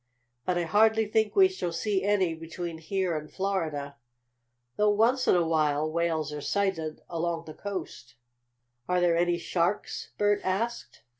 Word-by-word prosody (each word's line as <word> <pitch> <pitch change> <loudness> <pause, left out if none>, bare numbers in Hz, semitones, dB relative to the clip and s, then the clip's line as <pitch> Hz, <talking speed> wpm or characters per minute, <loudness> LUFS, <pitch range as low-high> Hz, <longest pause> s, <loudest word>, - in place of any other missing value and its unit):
But 180 -1 +1
I 175 - +1
hardly 220 +5 +4
think 215 0 +1
we 385 -1 +7
shall 370 - -4
see 190 +3 -1
any 195 -4 +2
between 165 +1 -6
here 185 +1 -1
and 155 0 -6
Florida, 155 -8 -2 0.8
though 210 0 +3
once 230 +5 +3
in - - +5
a 175 -1 +3
while 155 -1 +1
whales 160 -2 -1
are 150 - -5
sighted 165 -4 -1
along 165 0 -2
the 155 - -8
coast." 160 - -7 0.7
"Are 180 0 +3
there 175 -1 +3
any 175 0 +2
sharks?" 175 +3 -1
Bert 205 0 +2
asked. 225 +6 -3
175 Hz, 155 wpm, -28 LUFS, 160-205 Hz, 0.8 s, we